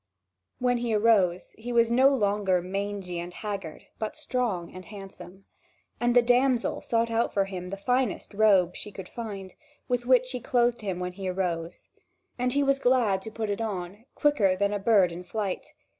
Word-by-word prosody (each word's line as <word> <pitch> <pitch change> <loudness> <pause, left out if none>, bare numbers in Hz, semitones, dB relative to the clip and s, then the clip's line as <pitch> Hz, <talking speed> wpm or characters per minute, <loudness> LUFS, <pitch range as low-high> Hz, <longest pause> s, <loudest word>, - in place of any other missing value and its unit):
When 245 -1 +1
he 235 -2 0
arose, 205 -5 +2
he 240 +2 -5
was 235 -1 +3
no 260 +3 +6
longer 205 -7 +1
mangy 190 -1 -4
and 175 +1 -6
haggard, 195 -5 -6 0.2
but 215 -1 -4
strong 215 -10 -2
and 185 0 -9
handsome. 195 -1 -11 0.5
And 240 0 +1
the 245 - +7
damsel 245 0 +2
sought 230 0 0
out 230 +1 +1
for 195 -1 +1
him 180 -2 -6
the 195 - -5
finest 250 +2 -1
robe 195 -4 +4
she 210 - -6
could 190 -2 -8
find, 200 -5 -7 0.3
with 245 -1 -1
which 255 -1 +5
she 255 0 -5
clothed 240 0 +1
him 190 -4 -3
when 180 0 -3
he 190 0 -4
arose. 175 -2 -3 0.5
And 250 0 +1
he 285 0 +2
was 275 0 +2
glad 245 -7 +2
to 220 - -7
put 220 -1 -3
it 205 - -3
on, 200 0 -5
quicker 220 -11 +3
than 200 +2 0
a 205 - -1
bird 195 -4 +4
in 175 +2 -7
flight. 195 +1 -3
205 Hz, 185 wpm, -27 LUFS, 185-240 Hz, 0.5 s, the